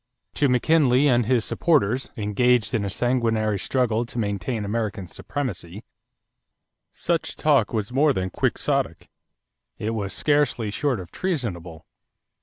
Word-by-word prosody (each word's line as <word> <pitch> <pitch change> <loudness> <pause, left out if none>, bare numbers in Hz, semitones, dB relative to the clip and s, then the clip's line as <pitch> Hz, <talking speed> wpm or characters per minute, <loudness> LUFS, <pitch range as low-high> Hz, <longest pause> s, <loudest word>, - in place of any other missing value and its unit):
= - - -57
To 140 - +4
McKinley 135 +1 +3
and 120 -4 +3
his 120 -3 +2
supporters, 135 -6 +1
engaged 110 +1 +1
in 110 - +1
a 100 - -2
sanguinary 110 -2 0
struggle 120 -2 0
to 120 - -8
maintain 105 +1 -2
American 105 -2 -2
supremacy, 100 - -5 1.1
such 170 0 -2
talk 140 -8 +2
was 110 +1 -3
more 145 +3 +4
than 95 -7 -2
quixotic; - - -1 0.7
it 110 - -3
was 100 -4 -3
scarcely 145 -7 +1
short 135 0 -1
of 90 -1 -9
treasonable. 90 - -4
115 Hz, 130 wpm, -24 LUFS, 100-130 Hz, 1.1 s, To